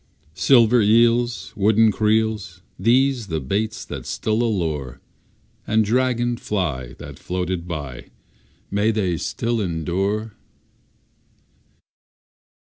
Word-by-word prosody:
Silver 115 +5 +4
eels, 115 +3 +2
Wooden 110 +2 +4
creels, 105 -4 0 0.2
These 125 +2 +2
the 80 -4 -2
baits 100 +11 -2
that - - -7
still 110 +1 -1
allure, 80 - -2 0.7
And 110 0 +2
dragon 120 +1 +1
fly 75 - -3
That - - -11
floated 90 -1 -3
by, 70 -7 -6 0.6
May 100 +2 +2
they 95 -6 0
still 115 +8 -2
endure? 95 +5 -2
105 Hz, 95 wpm, -22 LUFS, 90-115 Hz, 0.7 s, Silver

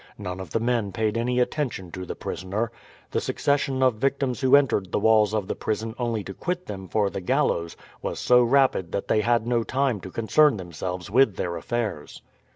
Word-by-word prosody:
None 95 -2 -5
of 95 -3 -7
the 115 - 0
men 115 -3 0
paid 110 +2 -1
any 125 +2 0
attention 125 - -2
to 95 +1 -6
the - - -5
prisoner. 105 +5 -3 0.4
The - - 0
succession 135 -2 0
of 125 -4 +3
victims 135 0 0
who 130 0 +6
entered 115 -10 +2
the - - +1
walls 110 -1 +4
of 105 -3 -1
the - - -1
prison 110 +1 -3
only 115 -4 -1
to 95 - -7
quit 180 - -3
them 95 -2 -7
for 100 -1 +1
the 100 - -4
gallows 85 -1 0 0.2
was - - -3
so 125 0 +5
rapid 125 -8 +2
that 100 - -2
they 110 - +3
had 115 0 +2
no 120 -1 +1
time 130 -1 0
to 95 - -9
concern 115 +6 +3
themselves 90 0 -6
with 125 -3 +4
their 85 -1 -3
affairs. 105 -4 -4
110 Hz, 200 wpm, -25 LUFS, 95-125 Hz, 0.4 s, who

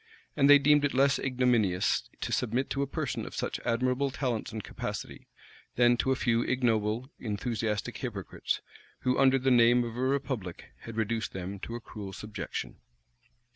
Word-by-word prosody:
And 140 -1 +4
they 145 - +10
deemed 145 +1 +4
it 145 - 0
less 135 +1 +4
ignominious 125 -8 +1
to - - -3
submit 125 +3 0
to 140 - 0
a 140 - 0
person - - -3
of - - -8
such - - -2
admirable 125 +4 0
talents 125 -5 -2
and 110 -2 -5
capacity, - - -6 0.5
than 120 0 +5
to 130 - +1
a - - +3
few 120 -2 +1
ignoble, 120 0 0
enthusiastic 110 -1 -2
hypocrites, - - -3 0.4
who, 125 0 +1
under 135 0 +5
the 130 0 +1
name 120 0 +5
of 115 -1 -5
a - - -5
republic, 130 -9 -2
had 115 -1 -7
reduced 110 0 -1
them 95 +1 -5
to 115 - -6
a - - -4
cruel 105 -4 -8
subjection. 105 +1 -6
120 Hz, 170 wpm, -29 LUFS, 110-130 Hz, 0.5 s, they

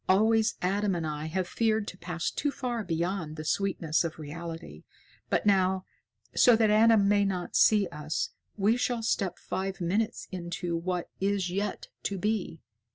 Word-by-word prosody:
Always 220 +3 +4
Adam 195 +1 +1
and 165 -2 -2
I 150 0 -3
have 180 +2 -1
feared 220 -1 +1
to 185 - -10
pass 170 -1 -3
too 290 - -1
far 245 -5 -3
beyond 170 -2 -2
the 155 0 -6
sweetness 170 -3 +1
of 165 -1 -4
reality. 160 - -7 0.5
But - - +1
now, 190 -2 +3 0.5
so 245 - +7
that 220 -1 +3
Adam 215 -1 +5
may 205 0 +4
not 185 -3 -2
see 210 -2 +5
us, 150 0 -3 0.3
we 210 +4 +3
shall 245 -2 -1
step 195 -5 0
five 195 +1 -4
minutes 210 +6 -1
into 175 -1 -3
what 175 +1 -3
is 195 -2 0
yet 200 +2 -3
to 200 - -2
be. 200 -5 -2
190 Hz, 160 wpm, -29 LUFS, 170-210 Hz, 0.5 s, so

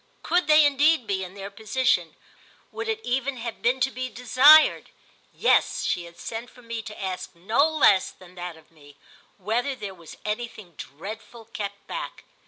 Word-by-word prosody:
Could 355 +1 +1
they 305 0 +7
indeed 290 -1 +3
be, 195 -2 -2
in 185 +1 -9
their 200 0 -7
position—would 255 - -3
it 440 0 -1
even 260 +2 -1
have 230 -1 -6
been 250 +3 +2
to 265 - +2
be 255 0 -4
desired? 260 +6 +5 0.4
Yes, - - +2
she 175 -1 -1
had 170 0 -14
sent 230 +2 -6
for 245 - -18
me 230 -1 -5
to 215 -1 -10
ask 185 -2 -5
no 225 - +2
less 275 -12 +4
than 180 -1 -17
that 175 -2 -7
of 160 0 -21
me—whether 200 - -6
there 205 -5 -7
was 170 -3 -13
anything 215 -4 -5
dreadful 215 - -9
kept 200 -1 -6
back. - - -6
225 Hz, 165 wpm, -25 LUFS, 190-260 Hz, 0.4 s, they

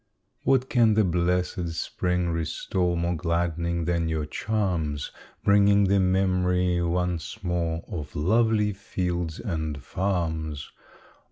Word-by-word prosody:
What 130 -1 +3
can 115 -5 +4
the 110 - +4
blessed 90 -1 0
spring 90 +1 -1
restore 85 +2 -1
More 85 +1 0
gladdening 85 0 -1
than 85 -1 0
your 80 -1 -1
charms? 85 -6 -2 0.3
Bringing 100 0 +5
the 100 +1 +3
memory 90 -1 +2
once 90 0 -2
more 85 -2 -1
Of 75 -4 -6
lovely 105 +5 +2
fields 90 -4 -3
and 80 - -3
farms! 80 -6 -2
90 Hz, 110 wpm, -26 LUFS, 85-95 Hz, 0.3 s, Bringing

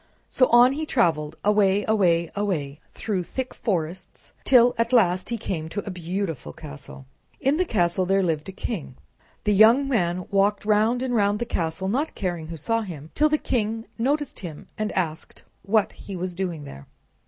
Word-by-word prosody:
So 255 - +4
on 240 +2 +6
he 305 +3 -3
traveled, 160 - +1
away, 205 -1 +3
away, 175 -6 +2
away, 155 -9 -2 0.2
through 205 -4 -2
thick 260 +8 -5
forests, 180 -4 -4
till 245 -2 +6
at 230 +1 +1
last 185 -7 +3
he 235 - -1
came 165 -7 -4
to 205 +4 -4
a 200 - -4
beautiful 180 -3 -4
castle. 145 -3 -10 0.3
In 275 +3 +2
the 365 - +2
castle 180 - +1
there 195 +1 +3
lived 160 -1 -1
a - - -4
king. 185 - -5 0.5
The 210 - +2
young 230 +7 +6
man 180 -8 0
walked 200 +1 +2
round 220 +4 +2
and 255 -1 -2
round 205 -2 +2
the 240 - -2
castle, 175 -3 -2
not 275 +10 -1
caring 175 -5 -3
who 165 0 -7
saw 230 +9 0
him, 160 -7 -8
till 305 +1 +3
the 305 - +2
king 225 -4 -2
noticed 285 +3 -1
him 165 -6 -8
and 215 0 -2
asked 160 -4 -3 0.2
what 205 +1 +1
he 195 - -9
was 180 0 -4
doing 175 -4 -3
there. 70 - -11
195 Hz, 180 wpm, -24 LUFS, 170-230 Hz, 0.5 s, on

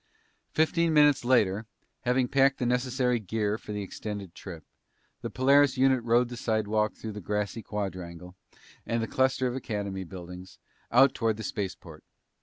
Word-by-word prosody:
Fifteen 160 +1 +2
minutes 145 -3 +5
later, 110 -4 +2 0.4
having 125 +1 +2
packed 135 +1 +3
the 125 - -2
necessary 125 0 +1
gear 110 +1 -2
for - - -9
the 105 -1 -3
extended 100 -2 -6
trip, 85 -6 -9 0.6
the - - -4
Polaris 140 +2 +4
unit 130 -2 +3
rode 120 +1 +3
the 120 - -6
slidewalk 110 -2 0
through 110 - -6
the 105 0 -7
grassy 105 +3 -2
quadrangle 90 -4 -6 0.5
and 115 0 -1
the - - -2
cluster 130 +1 +1
of 125 0 -1
Academy 100 -6 -4
buildings, 90 0 -10 0.3
out 135 +2 +6
toward 115 -5 0
the 110 - -6
spaceport. 90 -7 -5
110 Hz, 155 wpm, -28 LUFS, 100-130 Hz, 0.6 s, out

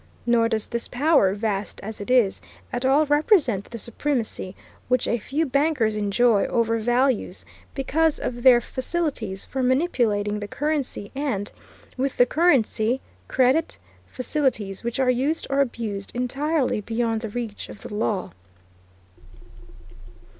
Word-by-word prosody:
Nor 235 -1 +3
does 220 -2 -1
this 235 -1 -3
power, 265 - +3
vast 205 -1 -2
as 215 0 -6
it 200 - -7
is, 245 -6 +3 0.3
at 245 +2 0
all 285 +3 +4
represent 290 - +3
the 235 - -8
supremacy 230 -5 -2 0.3
which 255 -1 +1
a 235 - 0
few 295 +9 -1
bankers 275 -6 +1
enjoy 210 +1 +2
over 230 -1 +1
values, 240 -4 0 0.3
because 305 +3 +1
of 240 -1 -4
their 245 -1 +7
facilities 260 - -3
for 265 - -3
manipulating 240 -7 +1
the 205 - -5
currency 285 -7 -2
and, 265 -8 -2 0.5
with 265 +1 -1
the 245 - +6
currency, 255 -6 +2 0.3
credit; 265 +5 +2 0.3
facilities, 250 - -2
which 235 +2 -3
are 255 -1 +4
used 275 +6 0
or 275 +1 +3
abused 220 -6 -3
entirely 270 +1 0
beyond 225 +1 -1
the 225 - -4
reach 225 -1 -5
of - - -11
the - - -8
law. 210 -2 -1
245 Hz, 135 wpm, -24 LUFS, 215-275 Hz, 0.5 s, their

